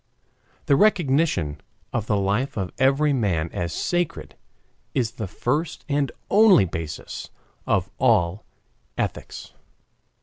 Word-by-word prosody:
The 140 - +4
recognition 140 - +2 0.3
of 115 -2 -2
the 105 - +2
life 105 +7 0
of 95 -2 -2
every 140 +3 +3
man 90 - 0
as 85 -1 -2
sacred 175 - -2 0.6
is 120 -4 +1
the 110 - -5
first 145 - -2
and 140 -3 0 0.2
only 205 - +6
basis 80 -3 -6 0.4
of - - +1
all 85 +3 +2 0.5
ethics. - - -4
120 Hz, 110 wpm, -24 LUFS, 90-145 Hz, 0.6 s, only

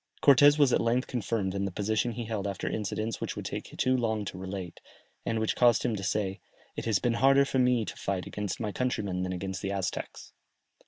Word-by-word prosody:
Cortès 145 +1 +7
was 145 -4 +4
at - - +3
length 120 +3 +1
confirmed 105 -5 -2
in 100 0 -1
the 100 - -3
position 110 +5 0
he 115 +1 -5
held 105 -3 -3
after 100 -2 -4
incidents 110 +1 -3
which - - -3
would - - -6
take - - -4
too 130 0 +2
long 110 -4 0
to 95 - -6
relate, 95 -2 -6 0.5
and 115 - 0
which 110 - 0
caused 120 -2 +4
him 115 - 0
to 100 - -5
say, 95 +1 -1 0.4
"It - - -5
has 110 -3 +3
been 120 +4 0
harder 135 +1 +6
for 135 -1 0
me 125 -3 +3
to - - -6
fight 95 -2 -3
against 105 -1 -4
my 110 -2 -2
countrymen 100 -7 -1
than 95 0 -2
against 95 0 -4
the 100 - -2
Aztecs." 95 -2 -4
110 Hz, 220 wpm, -29 LUFS, 95-120 Hz, 0.5 s, Cortès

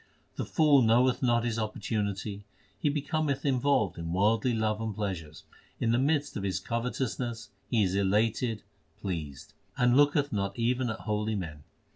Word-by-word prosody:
The - - -4
fool 150 -4 +5
knoweth 125 +3 +3
not 120 -2 +2
his 115 -1 -1
opportunity; 105 -2 -3 0.4
He 150 - +1
becometh 145 -1 -1
involved 130 - +1
in 85 0 -4
worldly 110 +5 +2
love 110 -1 0
and 110 -2 -3
pleasures; 90 -7 -4 0.4
In 115 - +1
the 120 - +3
midst 145 +1 +1
of 100 - -3
his 95 -1 -1
covetousness 115 -2 -3 0.2
he 115 -3 +3
is 95 -1 0
elated, 105 +3 +1 0.4
pleased. 80 -8 -5 0.2
And 125 0 +4
looketh 145 0 +3
not 100 0 -2
even 120 +1 +1
at 110 - -4
holy 105 +1 -1
men. 80 -6 -6
115 Hz, 155 wpm, -29 LUFS, 100-125 Hz, 0.4 s, fool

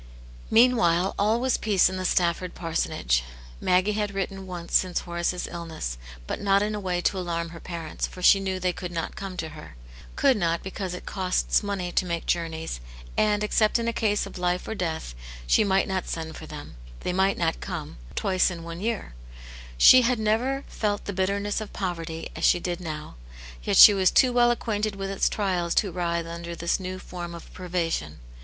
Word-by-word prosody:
Meanwhile 195 -7 +4
all 215 +3 +3
was 255 0 +1
peace 205 -4 +4
in 185 0 -3
the 185 - -3
Stafford 175 0 +1
parsonage; 60 - 0 0.4
Maggie 185 +3 +2
had 210 -1 -2
written 195 0 -3
once 175 -2 -4
since 185 -2 +2
Horace's 175 +1 -2
illness, 160 - -5 0.3
but - - -4
not 200 0 +3
in 210 +1 -1
a 210 - -3
way 180 -3 -1
to 190 - 0
alarm 170 -2 -2
her 165 0 -10
parents, 165 -3 -4
for 180 - -10
she 195 - +7
knew 190 -1 -2
they 180 -1 0
could 180 0 -6
not 165 -1 -4
come 195 -2 -6
to 160 -2 -3
her. 150 - -11 0.4
Could 270 -4 +4
not, 170 -3 0
because 190 -1 -4
it - - -9
costs 185 -2 +1
money 200 -4 -3
to 180 - 0
make 170 -1 -3
journeys, 165 - -2 0.4
and, 210 -1 +2
except 215 +1 +3
in 230 0 -2
a 235 - 0
case 210 -3 +1
of - - -9
life 180 0 0
or - - -2
death, 160 - -3 0.3
she - - +4
might 195 -1 +2
not 190 -2 -2
send 160 -1 -4
for 155 - -9
them, 150 - -9 0.2
they - - -2
might 190 +1 +2
not 165 -1 0
come, - - -6 0.2
twice 185 -1 +2
in 170 -2 -7
one 170 +1 -7
year. 220 - -3 0.6
She 255 - +9
had 250 0 +2
never 235 +6 0 0.2
Mt 205 -1 0
the 200 - -3
bitterness 200 +3 -1
of 215 - -8
poverty 165 -4 -4
as - - -6
she 175 - +5
did 175 0 -3
now; 150 - -6 0.4
yet - - 0
she 210 - +11
was 190 -2 +4
too 255 -2 +4
well 240 0 +5
acquainted 215 -3 -1
with 195 0 -4
its 195 - +1
trials 180 -5 -1
to 195 - +2
writhe 170 -1 -1
under 170 0 -6
this 170 +2 0
new 185 0 -5
form 175 -2 -7
of 170 - -12
privation. 165 - -2
185 Hz, 200 wpm, -26 LUFS, 170-205 Hz, 0.6 s, she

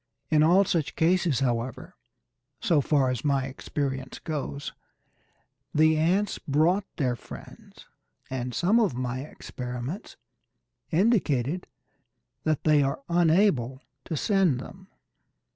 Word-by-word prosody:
In 155 -1 +5
all 180 +6 +5
such 165 -5 -1
cases, 165 -5 +2
however, 120 -1 -2 0.6
so 160 -4 +3
far 135 -2 +2
as 125 - -3
my 140 -3 +1
experience 135 0 -4
goes, 145 -2 -5 1.0
the 155 +1 +5
ants 180 +7 +1
brought 165 +8 +2
their 125 -5 0
friends, - - -12 0.4
and 125 -1 -3
some 200 +7 +3
of 210 - +1
my 125 0 -2
experiments 125 - -6 0.7
indicated 175 - +1 0.8
that 155 -2 +1
they 150 -2 +5
are 140 0 -1
unable 165 - +3 0.3
to 160 - -3
send 190 - +2
them. 190 +8 -11
150 Hz, 110 wpm, -27 LUFS, 130-175 Hz, 1.0 s, In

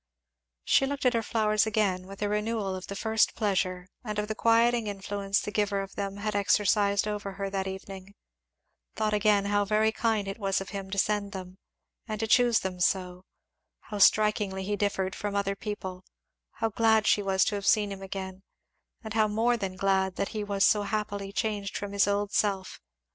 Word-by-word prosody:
She 270 - +3
looked 280 0 -4
at 250 - +4
her 230 - +1
flowers 215 -1 +1
again 195 -4 0
with 195 +1 -7
a - - +1
renewal 210 -2 -1
of 185 0 -7
the 200 - -6
first 220 +1 +1
pleasure 185 -4 -1 0.2
and 210 -3 -4
of 210 0 -1
the 215 - -2
quieting 230 +1 +3
influence 200 0 -1
the 210 - -5
giver 205 -1 0
of 195 0 -8
them 200 -1 -4
had 210 0 -3
exercised 200 0 +2
over 205 -2 -4
her 195 0 -4
that 195 -1 -2
evening; 190 +1 -8 0.8
thought 215 -1 0
again 205 -1 +3
how 205 0 +2
very 215 +2 +2
kind 220 -3 0
it 195 +3 -5
was 195 -2 0
of 195 - -7
him 195 -2 -6
to 200 - -4
send 205 0 0
them, 185 -1 -8 0.5
and 215 -2 -4
to 225 - 0
choose 240 +1 +4
them 185 -1 -4
so; 180 0 0 0.7
how 210 - -3
strikingly 205 -2 +3
he 205 +2 -1
differed 200 -2 -1
from 205 -1 -4
other 200 0 0
people; 190 -3 -6 0.5
how 225 - -1
glad 220 0 +3
she 210 - +4
was 190 -1 +2
to 220 - -1
have 200 -1 -3
seen 205 -2 +3
him 195 -1 -7
again, 190 -1 -6 0.6
and 220 -1 -6
how 215 -1 +3
more 225 +3 +2
than 195 -5 -4
glad 190 -1 +1
that - - -2
he 215 -2 -4
was 200 -1 +1
so 210 - +4
happily 205 -1 -3
changed 205 -2 -2
from 205 -1 -5
his 200 -1 +2
old 205 0 0
self. 195 -3 -1
205 Hz, 195 wpm, -28 LUFS, 195-215 Hz, 0.8 s, at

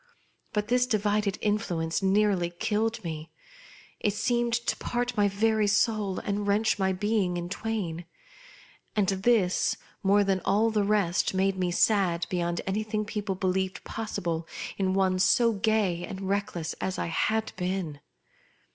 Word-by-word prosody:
But 210 0 -1
this 250 0 +3
divided 210 -3 +1
influence 180 -7 0
nearly 195 -2 +2
killed 220 +5 -1
me; 160 -1 -5 0.7
it 205 -1 0
seemed 240 +1 +1
to 235 +1 0
part 245 0 -2
my 205 -2 +3
very 215 +1 +2
soul 210 -2 +1
and 205 0 -2
wrench 205 +1 +2
my 190 0 +2
being 190 -2 0
in 175 0 -4
twain; 190 -5 -3 0.9
and 205 -3 +2
this 195 -1 +2 0.2
more 200 +1 +4
than 195 -1 +1
all 215 +4 +2
the 210 -2 +1
rest, 200 -3 +1
made 190 +1 +2
me 185 -1 0
sad 175 -2 +2
beyond 175 -1 -1
anything 215 +2 -1
people 205 -2 -3
believed 190 0 -1
possible 170 -7 -3 0.3
in 190 -1 0
one 190 -1 +2
so 230 +5 +4
gay 200 -4 +1
and 190 +1 -6
reckless 195 -5 -2
as 190 - -2
I - - -1
had 220 +6 0
been. 180 -5 -3
200 Hz, 145 wpm, -28 LUFS, 185-215 Hz, 0.9 s, more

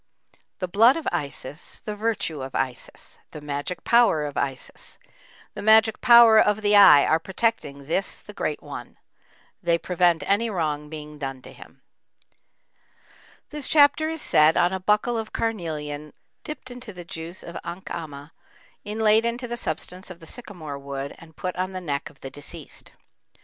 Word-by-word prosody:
The 185 - -3
blood 225 - +5
of 325 - -5
Isis, 145 +1 -5
the 210 - -5
virtue 210 -9 -2
of 130 0 -7
Isis; 130 -2 -4
the - - -9
magic 145 +4 -4
power 235 -11 +4
of 145 - -6
Isis, 135 -2 -4 0.6
the - - -7
magic 220 +1 +5
power 235 -3 +8
of 210 0 +2
the 205 0 +4
Eye 195 -8 +9
are 160 - +3
protecting 175 -7 -2
this 175 +6 -1
the - - -13
Great - - -3
one; - - -9 0.6
they 170 -2 +2
prevent 175 -2 +2
any 210 +6 +2
wrong 150 -6 -2
being 150 -1 -9
done 135 -2 -5
to - - -11
him. - - -16 1.7
This 295 -3 -3
chapter 300 +1 +5
is 320 -1 -4
said 155 +1 +5
on 175 +2 +3
a 190 - -2
buckle 210 +5 +1
of 220 - -6
carnelian 155 -9 -3 0.3
dipped 305 -4 -7
into 245 -3 -9
the 175 -1 -9
juice 170 0 -7
of 170 - -9
ankhama, 160 -4 -7 0.5
inlaid 215 +1 +3
into 235 +2 -2
the 240 - -3
substance 185 -5 -5
of 180 -2 -10
the 165 - -13
sycamore 160 - -7
wood 140 0 -5
and 160 -2 -16
put 180 -1 -4
on 185 +1 -2
the 185 - -4
neck 145 -5 -3
of 150 - -22
the 135 - -7
deceased. 145 - -9
180 Hz, 165 wpm, -24 LUFS, 150-220 Hz, 1.7 s, Eye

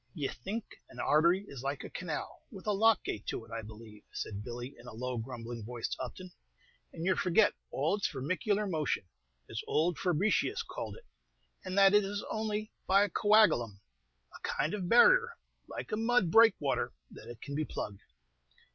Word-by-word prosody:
"Ye 140 -3 -2
think 200 - -5 0.2
an - - -14
artery 170 +6 +3
is 135 -3 -8
like 140 +1 -3
a - - -7
canal, 165 -4 -5
with 195 -3 -11
a 210 - +1
lock 220 +1 +4
gate 105 - -5
to 115 - -3
it, 115 - -18
I 115 0 -3
believe," 110 -1 -12
said 105 -1 -5
Billy, 120 +3 -6
in 120 - -13
a 125 - -8
low, 125 +1 -3
grumbling 115 -1 -6
voice, 120 +1 -4
to - - -4
Upton, 180 +9 -7 0.6
"and 165 0 -6
you 190 0 +3
forget 185 +4 +3 0.2
all 155 +9 0
its 200 - 0
vermicular 185 - -1
motion, 155 - -1 0.4
as - - -4
ould 165 +2 +1
Fabricius 185 +3 +1
called - - -6
it, 475 - -17 0.6
and 185 +1 -4
that 195 0 +7
it 210 0 +6
is 200 +1 -4
only 215 0 -2 0.2
by 195 +2 +5
a 205 - 0
coagalum, 170 - +4 0.6
a - - -10
kind 155 - -1
of 185 -4 -3
barrier, 470 - +6 0.3
like - - -7
a 215 - 0
mud 225 -5 +2
breakwater, 150 - +4 0.2
that - - -11
it 120 -2 -9
can 140 - -7
be 155 +2 0
plugged. 105 -8 -5
165 Hz, 185 wpm, -32 LUFS, 120-205 Hz, 0.6 s, that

